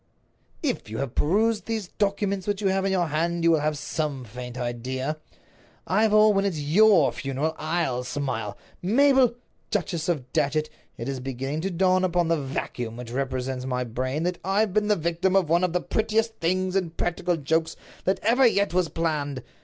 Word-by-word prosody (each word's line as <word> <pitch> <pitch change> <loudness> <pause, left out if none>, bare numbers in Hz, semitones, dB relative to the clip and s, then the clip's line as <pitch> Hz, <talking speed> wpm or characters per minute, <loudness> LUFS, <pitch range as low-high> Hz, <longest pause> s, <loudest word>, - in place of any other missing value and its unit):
"If 255 - -2
you 110 - -5
have 135 -3 -3
perused 210 +7 +1
those 220 -5 -3
documents 200 -1 -1
which 205 -1 0
you 200 -2 +1
have 190 0 +1
in 195 - +1
your 180 -2 +2
hand, 170 +3 0
you 170 - +5
will 160 - +4
have 150 0 -1
some 145 -2 -3
faint 125 +2 -8
idea. 130 +4 -3 0.7
Ivor, 215 +1 +4
when 195 -2 +2
it's 190 -6 -1
your 165 +2 +5
funeral, 140 +4 -2
I'll 155 -6 -1
smile. 125 -6 -3 0.2
Mabel, 255 +4 +4 0.3
Duchess 170 -4 -1
of 135 -7 -2
Datchet, 155 +2 +1 0.3
it 115 - -5
is 135 -1 -3
beginning 135 +4 -3
to 190 - -1
dawn 185 +1 +2
upon 175 -2 +1
the 165 -3 +1
vacuum 125 -4 -4
which 120 -1 -7
represents 130 0 -2
my 125 -1 -1
brain 130 +6 -2
that 180 0 -1
I've 195 +1 +1
been 210 0 +2
the 210 - +4
victim 170 +3 0
of 185 -5 +3
one 170 +2 +3
of 180 - +2
the 180 +1 0
prettiest 220 +1 0
things 185 +2 0
in 185 -3 +1
practical 175 +1 -1
jokes 160 +2 0 0.3
that 190 - +1
ever 245 +4 +5
yet 200 -5 +1
was 180 -2 +2
planned. 145 -5 -2
165 Hz, 185 wpm, -25 LUFS, 135-195 Hz, 0.7 s, you